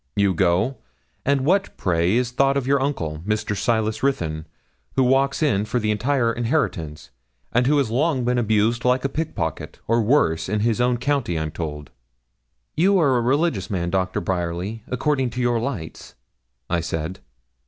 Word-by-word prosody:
You 100 Hz, -2 st, +3 dB
go 95 Hz, +9 st, +1 dB, 0.5 s
and 140 Hz, -1 st, +3 dB
what 195 Hz, +5 st, +1 dB
pray 85 Hz, +2 st, +1 dB
is 125 Hz, 0 st, +1 dB
thought 135 Hz, +2 st, +2 dB
of 135 Hz, -, -1 dB
your 140 Hz, 0 st, +2 dB
uncle, 85 Hz, -, -2 dB
Mr. 105 Hz, +3 st, -2 dB
Silas 110 Hz, +1 st, 0 dB
Ruthyn, 80 Hz, -, -1 dB, 0.5 s
who 135 Hz, -, +3 dB
walks 135 Hz, +3 st, +2 dB
in 105 Hz, -10 st, +2 dB
for 110 Hz, +3 st, -1 dB
the 105 Hz, -1 st, 0 dB
entire 120 Hz, +1 st, +1 dB
inheritance, 95 Hz, -, -2 dB, 0.4 s
and 125 Hz, +1 st, +3 dB
who 150 Hz, +1 st, +3 dB
has 135 Hz, -6 st, +1 dB
long 130 Hz, 0 st, +1 dB
been 125 Hz, 0 st, +1 dB
abused 110 Hz, +2 st, +1 dB
like 125 Hz, +1 st, +2 dB
a -, -, +1 dB
pickpocket, 135 Hz, -, -4 dB
or 115 Hz, +1 st, +3 dB
worse, 95 Hz, -, +2 dB
in 105 Hz, +1 st, 0 dB
his 115 Hz, +1 st, +1 dB
own 125 Hz, 0 st, +2 dB
county, 125 Hz, -, -1 dB
I'm 80 Hz, -1 st, -2 dB
told?' 75 Hz, -3 st, -6 dB, 0.8 s
'You 190 Hz, +5 st, +4 dB
are 145 Hz, -7 st, +3 dB
a 120 Hz, -, +2 dB
religious 130 Hz, -, 0 dB
man, 85 Hz, -3 st, -2 dB
Doctor 95 Hz, -1 st, 0 dB
Bryerly, 90 Hz, +4 st, -3 dB
according 135 Hz, 0 st, 0 dB
to 120 Hz, +2 st, -6 dB
your 120 Hz, -1 st, +1 dB
lights?' 110 Hz, -10 st, -6 dB, 0.5 s
I 85 Hz, +3 st, 0 dB
said. 80 Hz, +1 st, -4 dB
115 Hz, 170 wpm, -22 LUFS, 90-135 Hz, 0.8 s, You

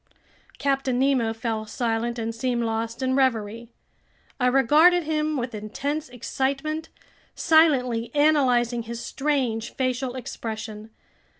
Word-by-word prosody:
Captain 270 Hz, -2 st, 0 dB
Nemo 260 Hz, -4 st, +2 dB
fell 225 Hz, -1 st, -3 dB
silent 235 Hz, +1 st, -2 dB
and 230 Hz, 0 st, -3 dB
seemed 235 Hz, +1 st, -1 dB
lost 225 Hz, +2 st, -2 dB
in 260 Hz, 0 st, +1 dB
reverie. 230 Hz, -3 st, 0 dB, 0.7 s
I 250 Hz, -, +3 dB
regarded 300 Hz, +8 st, +5 dB
him 305 Hz, -1 st, -1 dB
with 245 Hz, -1 st, -3 dB
intense 280 Hz, +8 st, -4 dB
excitement, 275 Hz, +6 st, -2 dB, 0.5 s
silently 260 Hz, -8 st, +3 dB
analyzing 255 Hz, -6 st, +3 dB
his 230 Hz, +1 st, -6 dB
strange 260 Hz, -6 st, -1 dB
facial 255 Hz, -1 st, -1 dB
expression. 220 Hz, -4 st, -6 dB
250 Hz, 110 wpm, -25 LUFS, 230-275 Hz, 0.7 s, regarded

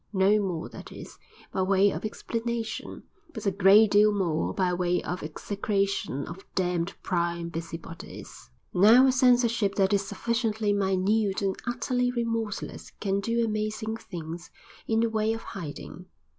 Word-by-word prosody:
No 200 Hz, +2 st, +4 dB
more, 180 Hz, -5 st, -3 dB
that -, -, -11 dB
is, -, -, -11 dB, 0.3 s
by 190 Hz, -, 0 dB
way 195 Hz, +1 st, +4 dB
of -, -, -5 dB
explanation, 230 Hz, +1 st, -4 dB, 0.3 s
but 220 Hz, -, -6 dB
a 200 Hz, -, +3 dB
great 200 Hz, +3 st, +6 dB
deal 210 Hz, +1 st, +6 dB
more 175 Hz, -6 st, 0 dB
by 185 Hz, -2 st, 0 dB
way 180 Hz, 0 st, +1 dB
of 180 Hz, +1 st, -4 dB
execration 195 Hz, -1 st, -2 dB
of 185 Hz, +4 st, -9 dB
"damned, 180 Hz, -1 st, 0 dB
prying 170 Hz, -2 st, -1 dB
busybodies." 165 Hz, -, -8 dB, 0.2 s
Now 220 Hz, +8 st, +7 dB
a 265 Hz, -, +5 dB
censorship 240 Hz, -5 st, +3 dB
that 195 Hz, 0 st, +2 dB
is 200 Hz, -1 st, +2 dB
sufficiently 220 Hz, 0 st, -1 dB
minute 195 Hz, +1 st, +1 dB
and 195 Hz, -1 st, 0 dB
utterly 245 Hz, +1 st, 0 dB
remorseless 230 Hz, -3 st, -3 dB
can 195 Hz, -1 st, 0 dB
do 230 Hz, +3 st, 0 dB
amazing 215 Hz, 0 st, -2 dB
things 170 Hz, -5 st, -8 dB, 0.4 s
in 225 Hz, 0 st, +2 dB
the 230 Hz, -, +3 dB
way 220 Hz, 0 st, +1 dB
of 225 Hz, -, -6 dB
hiding 175 Hz, -1 st, -8 dB
200 Hz, 145 wpm, -27 LUFS, 180-225 Hz, 0.4 s, Now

